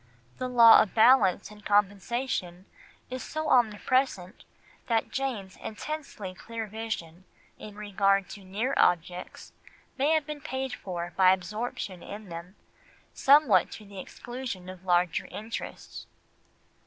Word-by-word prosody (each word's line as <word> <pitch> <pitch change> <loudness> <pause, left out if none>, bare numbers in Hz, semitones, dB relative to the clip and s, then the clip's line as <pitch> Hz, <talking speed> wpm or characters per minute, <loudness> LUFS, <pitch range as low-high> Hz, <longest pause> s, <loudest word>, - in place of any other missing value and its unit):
The 255 - -2
law 235 -2 +8
of 205 - -2
balance 220 -4 +5
and 210 0 -14
compensation 205 -2 0 0.5
is 255 0 -4
so 310 0 -3
omnipresent, 240 -3 +1 0.4
that 230 -2 0
Jane's 230 -9 -3
intensely 220 -6 -6
clear 225 +4 -6
vision 200 -5 -6 0.3
in 210 -1 -10
regard 195 -2 +1
to 200 - -10
near 210 +8 -2
objects 175 +1 0 0.5
may 290 +4 +3
have 310 -2 +1
been 300 -1 -7
paid 265 -3 -4
for 175 -2 -5
by 185 -1 +6
absorption 190 -1 -3
in 205 -1 -9
them, 170 +3 -8 0.6
somewhat 270 - +5
to 215 - -10
the 200 -1 -10
exclusion 240 -6 -7
of 185 0 -11
larger 175 -2 +1
interests. 220 +2 -7
210 Hz, 125 wpm, -28 LUFS, 185-250 Hz, 0.6 s, law